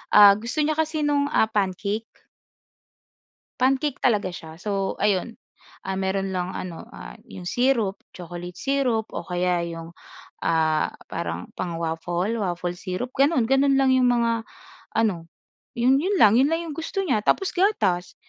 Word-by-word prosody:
ah 205 -1 +10
gusto 240 +7 -1
niya 310 +1 0
kasi 315 -1 0
nung 290 -1 +2
ah, 220 - +3
pancake. 205 +2 -1 1.5
Pancake 270 +2 +1
talaga 210 -6 +1
siya. 160 -2 -9
So 195 +2 -2
ayun 210 +3 +1 0.5
ah, 190 0 -3
meron 190 0 -1
lang 180 0 -3
ano 175 -3 -6
ah, - - -10
'yong 180 - -9
syrup, 230 -2 +1 0.2
chocolate 175 0 -8
syrup 260 -6 0
o - - -4
kaya 180 -1 0
'yong 165 0 -7 0.5
ah, 160 -1 +1 0.2
parang 85 +1 -4
pang-waffle, 175 +4 -2
waffle 175 -2 -2
syrup. 190 +7 -4
Gano'n 275 -1 +3
gano'n 270 +3 +3
lang 270 -1 +4
'yong 260 -1 +4
mga 230 -2 +1 0.5
ano 195 -7 0 0.5
'yon 255 +3 +3
'yon 380 +7 0
lang 220 +2 +6
'yon 270 - +5
lang 330 +2 0
'yong 325 -3 -6
gusto 330 +4 -2
niya 270 - +1
tapos 390 - +1
gatas 210 - +1
215 Hz, 150 wpm, -24 LUFS, 180-270 Hz, 1.5 s, ah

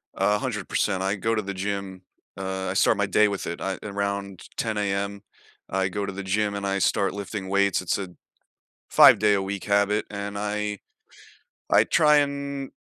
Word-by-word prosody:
100%, 105 -3 0
I 95 +1 0
go 115 +3 0
to 110 - 0
the 100 0 -5
gym 95 -1 -4 0.3
uh, 95 0 -4
I - - -1
start - - +3
my - - +1
day 105 - +4
with 100 -1 -3
it, 85 - -5
I 95 -1 -2
around 100 -2 -4
10AM, 110 -2 -1 0.9
I 95 0 0
go 100 +2 -3
to 100 - -4
the 100 +1 -6
gym 100 +2 0
and 100 - -4
I 100 0 0
start 95 +3 +1
lifting 100 -1 -5
weights, 100 0 +2
it's 90 - -1
a 95 -2 -5 0.8
5 - - +8
day 105 0 +4
a 95 - 0
week 95 0 -4
habit, 100 +1 +2
and 100 0 -5
I 105 0 -2 0.9
I - - +6
try 150 -1 +4
and 140 -1 -2
100 Hz, 180 wpm, -25 LUFS, 95-105 Hz, 0.9 s, 5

